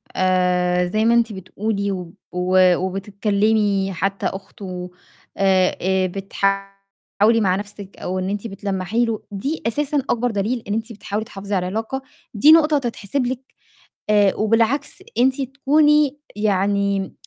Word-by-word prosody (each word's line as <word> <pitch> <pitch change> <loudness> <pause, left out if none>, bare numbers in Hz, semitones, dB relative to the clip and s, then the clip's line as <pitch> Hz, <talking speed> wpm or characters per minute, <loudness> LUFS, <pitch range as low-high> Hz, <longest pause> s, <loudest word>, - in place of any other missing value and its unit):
آآ 180 -1 +2
زي 215 +4 0
ما 230 - +4
أنتِ 235 -2 +2
بتقولي 200 +2 -3
و 180 -3 -6 0.2
و 180 0 +4
وبتتكلّمي 200 +1 0
حتّى 195 +2 -2
أخته 185 -2 -6 0.5
آآ 190 -2 +3
آآ 190 0 +1
بتحاولي 195 +3 -1
مع 185 -3 +2
نَفْسِك 205 0 -8
أو 185 +1 -3
إن 185 +1 -2
أنتِ 205 +2 -3
بتلمّحي 195 +2 -1
له، 225 -2 -3
دي 275 +11 -3
أساسًا 295 +5 -1
أكبر 240 0 +1
دليل 220 +4 -1
إن 205 - -1
أنتِ 225 +1 -3
بتحاولي 210 +1 -4
تحافظي 200 -1 -5
على 180 -1 0
العلاقة، 225 +7 -3 0.3
دي 285 +9 +6
نقطة 310 -2 +6
تتحسب 245 0 -2
لِك 250 +1 -3 0.7
آآ 205 -2 +4
وبالعكس 230 - +1 0.2
أنتِ 265 +2 +3
تكوني 290 +2 +2 0.2
يعني 200 -1 0
200 Hz, 135 wpm, -21 LUFS, 190-230 Hz, 0.7 s, دي